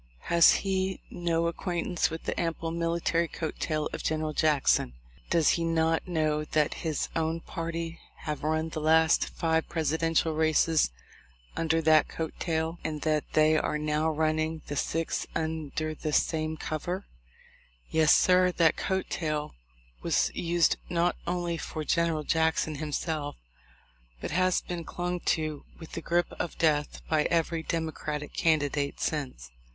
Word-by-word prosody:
Has 170 -1 +8
he 190 0 0
no 170 -1 0
ac 170 - -3
quaintance 175 -1 0
with 160 +1 -6
the - - -2
ample 165 -1 -2
military 170 0 0
coat 160 0 -5
tail 155 -2 -1
of - - -4
Gen 155 0 -1
eral 155 -1 -3
Jackson? 145 - +2 0.4
Does 165 -3 +4
he 170 - +2
not 165 +1 +1
know 155 -3 0
that 150 0 +1
his 160 -4 -1
own 165 0 0
party 165 0 -5 0.2
have 150 -1 -4
run 155 +1 0
the 155 - -5
last 160 +1 +4
five 160 -1 0
Presidential 160 0 +1
races 160 0 +3 0.7
under 165 0 +1
that 155 0 +5
coat 160 -1 -4
tail? 160 0 -1
and 155 -2 -3
that 155 -1 0
they 155 0 +5
are 155 - 0
now 150 +1 0
running 155 0 0
the 145 - -5
sixth 165 +3 -1
under 155 -1 -2
the 155 0 -4
same 155 +1 0
cover? 175 +6 -3 0.9
Yes, 160 -2 +4
sir, 180 0 +5
that 165 -2 +3
coat 190 -1 -1
tail 155 -3 -2 0.5
was - - +1
used 170 -1 +2
not 175 0 +1
only 175 -1 -1
for 155 - -5
General 165 0 +1
Jackson 160 0 +1
himself, 150 -1 -2 0.8
but - - -5
has 185 +2 +2
been 175 -1 -5
clung 180 +2 -3
to 155 -3 -1
with 165 - -11
the - - -5
grip 175 0 0
of 175 - -3
death 150 -2 +1
by 155 -1 +2
every 165 -1 +1
Demo 160 0 -2
cratic 150 -1 -5
candidate 145 -3 +1
since. 130 - -3
160 Hz, 150 wpm, -28 LUFS, 155-170 Hz, 0.9 s, Has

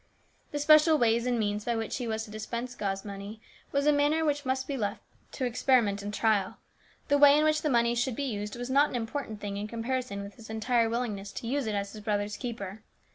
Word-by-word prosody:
The 290 - -3
special 305 +2 +6
ways 235 -1 +2
and 245 -1 +1
means 210 -1 -1
by 235 +1 -1
which 225 -1 -2
he 245 -2 -4
was 220 0 -2
to 210 - -13
dispense 235 +3 -5
God's 195 -4 -3
money 200 +2 -7 0.3
was 280 0 +1
a 300 - +6
matter 295 +2 +2
which 290 -2 0
must 260 0 -1
be 280 - -2
left 210 -6 -3 0.3
to 260 - -2
experiment 235 -4 +2
and 205 +1 -4
trial. 210 -3 +1 0.5
The 285 - +4
way 290 0 +8
in 305 - +3
which 310 0 +2
the 305 - 0
money 235 -2 +3
should 245 0 0
be 285 - -3
used 210 -5 -3
was 245 +1 -5
not 285 +3 +4
an - - -6
important 225 -1 -4
thing 200 -1 -4
in 205 +1 -3
comparison 230 -2 -3
with 200 0 -10
his 225 -1 -12
entire 225 +1 +1
willingness 215 -4 -3
to 230 - -6
use 270 0 -1
it 215 - -1
as 200 0 -3
his 215 - -8
brother's 205 0 -1
keeper. 220 -4 -6
235 Hz, 235 wpm, -29 LUFS, 210-265 Hz, 0.5 s, way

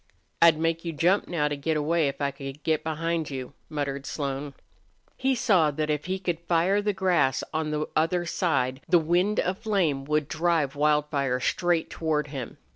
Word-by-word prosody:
"I'd 165 -2 +7
make 165 +1 0
you 165 -3 -5
hump 185 +4 +3
now 150 -4 0
to 145 - -2
get 155 +2 -1
away 155 +1 +1
if 140 - -4
I 140 0 +1
could 135 +1 -8
get 160 -2 +1
behind 160 0 -2
you," 130 -1 -6 0.2
muttered 140 -2 -3
Slone. 140 -1 -4 0.6
He 265 0 +1
saw 200 -11 +3
that 150 +1 -1
if 150 -1 -2
he 185 +1 -1
could 175 -3 -2
fire 175 +4 +2
the 210 0 +1
grass 175 -9 +1
on 155 -1 -1
the 150 0 -1
other 170 +3 +1
side 135 -7 0
the 180 - +6
wind 175 +6 +1
of 185 +2 -1
flame 175 -11 0
would 150 0 0
drive 160 -3 0
Wildfire 145 -3 +1
straight 175 +4 0
toward 150 -2 -1
him. 135 -5 -6
155 Hz, 185 wpm, -26 LUFS, 145-175 Hz, 0.6 s, I'd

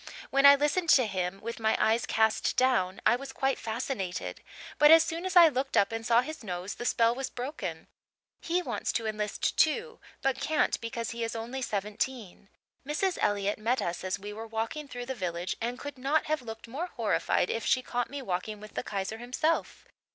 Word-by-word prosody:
When 275 +1 +6
I 280 - +10
listened 300 +5 0
to 255 - +2
him 190 -2 -2
with 230 +1 -5
my 220 -1 +2
eyes 225 +1 +2
cast 220 -1 +2
down 195 -8 +2
I - - +6
was 270 +2 -7
quite 265 0 0
fascinated; 220 -5 -4 0.4
but 295 - +8
as 325 0 +9
soon 335 +3 -3
as 370 - -4
I 345 -2 +10
looked 270 -2 -1
up 200 - +4
and 225 0 -4
saw 235 +1 +4
his 310 +1 -7
nose 185 0 -4
the 240 - -7
spell 230 -1 +3
was 265 +1 -4
broken. 260 +5 -5 0.6
He 355 +2 0
wants - - -2
to 230 - -1
enlist, 210 -1 -2
too, 455 +10 +2 0.2
but 270 -1 0
can't 310 -1 +1
because 230 0 -4
he 235 0 -4
is 230 0 -3
only 235 +4 -4
seventeen. 210 -1 -4 0.3
Mrs. 330 +6 -1
Elliott 205 0 +1
met 240 +4 +1
us 175 -4 -3
as 185 0 -1
we 205 +1 -7
were 225 +2 -7
walking 225 +7 -3
through 245 -2 -6
the 265 - -3
village 175 -5 -3
and 240 +2 -2
could 285 0 -8
not 280 +5 +1
have 310 -2 -1
looked 225 -1 -8
more 290 +10 -4
horrified 220 - 0
if 225 - -2
she 255 - +2
caught 245 0 -2
me 280 -1 -6
walking 205 +1 -3
with 215 0 -11
the - - -2
Kaiser 200 +2 -4
himself. 255 +7 -1
235 Hz, 205 wpm, -29 LUFS, 215-275 Hz, 0.6 s, I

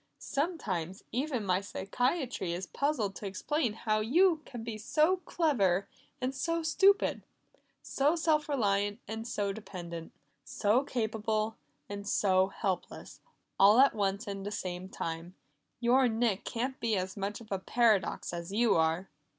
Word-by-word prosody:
Sometimes 200 - -3
even 255 -4 -1
my 185 0 +2
psychiatry 245 - -1
is 180 +2 -4
puzzled 235 - -1
to 205 - -5
explain 245 +4 -1
how 215 -1 0
you 320 - +3
can 240 -3 -7
be 225 -1 -4
so 305 - +2
clever 200 - +2 0.3
and 255 0 -1
so 330 +5 -1
stupid, 395 +6 +3 0.6
so 290 +4 +2
self 315 -2 +1
reliant 205 -5 +1
and 220 +2 -5
so 200 -3 -1
dependent, 175 -6 -7 0.3
so 215 +6 +1
capable 220 -3 -1 0.3
and 205 0 -5
so 190 -2 +3
helpless 190 -2 -4 0.4
all 205 +3 +7
at 275 +1 +6
one 200 -3 0
and 200 -2 -5
the 205 - -3
same 185 -2 -4
time. 165 +1 -5 0.4
Your 250 +2 +4
Nick 225 -3 0
can't 255 +3 -3
be 225 -2 +1
as 185 +1 -3
much 200 0 -3
of 220 -3 -14
a 195 - 0
paradox 215 -3 +1
as 170 +1 -5
you 230 +2 +3
are!" 165 +3 +1
215 Hz, 145 wpm, -31 LUFS, 195-260 Hz, 0.6 s, all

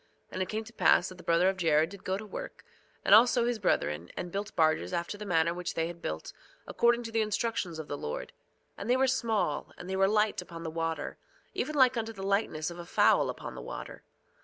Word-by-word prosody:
And 185 - -3
it 185 - -2
came 220 +1 -2
to 235 - -14
pass 195 - +4
that 185 -1 -12
the - - -11
brother 170 +2 +3
of 190 0 +1
Jared 160 -1 +3
did 200 -1 -11
go 190 +1 -1
to 215 - -7
work, 210 - -8 0.4
and - - +5
also 240 +2 +6
his 240 -2 -1
brethren, 85 - 0
and 175 - -4
built 200 +2 -4
barges 155 - +2
after 170 +4 -2
the 210 0 -7
manner 170 -2 +2
which 180 0 -4
they 165 - +1
had 170 0 -7
built, 80 +1 -5 0.3
according 240 0 +2
to 225 - -6
the 225 0 +1
instructions 215 -5 -1
of 160 -2 -6
the 145 - -4
Lord. 75 - -5 0.5
And 200 - -5
they 250 - +4
were 265 - +4
small, 225 - 0
and 180 - -9
they 190 - -2
were 195 0 +4
light 210 +1 +2
upon 165 -1 -9
the 160 - -4
water, 165 -2 -3 0.3
even 305 - -2
like 260 -3 +5
unto 225 0 -2
the 195 -2 -8
lightness 195 -6 0
of 170 - -9
a 170 - -7
fowl - - +4
upon - - -6
the - - -8
water. - - -7
190 Hz, 235 wpm, -30 LUFS, 165-220 Hz, 0.5 s, also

